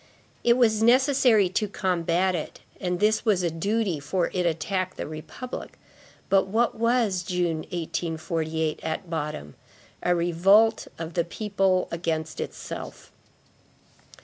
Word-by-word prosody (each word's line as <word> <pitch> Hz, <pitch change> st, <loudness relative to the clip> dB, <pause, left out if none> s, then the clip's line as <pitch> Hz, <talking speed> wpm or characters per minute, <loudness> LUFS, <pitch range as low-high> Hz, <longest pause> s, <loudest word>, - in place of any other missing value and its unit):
It 235 Hz, 0 st, +4 dB
was 220 Hz, -3 st, +3 dB
necessary 250 Hz, -3 st, +5 dB
to 210 Hz, +3 st, 0 dB
combat 185 Hz, -1 st, 0 dB
it, 165 Hz, -3 st, -5 dB, 0.2 s
and 180 Hz, -1 st, -2 dB
this 215 Hz, +2 st, +2 dB
was 200 Hz, -5 st, +2 dB
a 170 Hz, -, +1 dB
duty, 195 Hz, 0 st, -1 dB
for 170 Hz, +5 st, -1 dB
it 180 Hz, -2 st, +1 dB
attacked 185 Hz, +3 st, -2 dB
the -, -, -3 dB
republic. 155 Hz, +11 st, -8 dB, 0.5 s
But 195 Hz, -1 st, +3 dB
what 225 Hz, +4 st, +1 dB
was 230 Hz, -5 st, +1 dB
June, 175 Hz, -2 st, -1 dB
1848, 160 Hz, -2 st, -2 dB
at 160 Hz, +2 st, -4 dB
bottom? 145 Hz, -, -4 dB, 0.5 s
A 180 Hz, -, +2 dB
revolt 190 Hz, +6 st, +4 dB
of 165 Hz, 0 st, -6 dB
the 170 Hz, -, +1 dB
people 195 Hz, 0 st, 0 dB
against 160 Hz, -2 st, -2 dB
itself. -, -, -7 dB
180 Hz, 125 wpm, -26 LUFS, 165-210 Hz, 0.5 s, necessary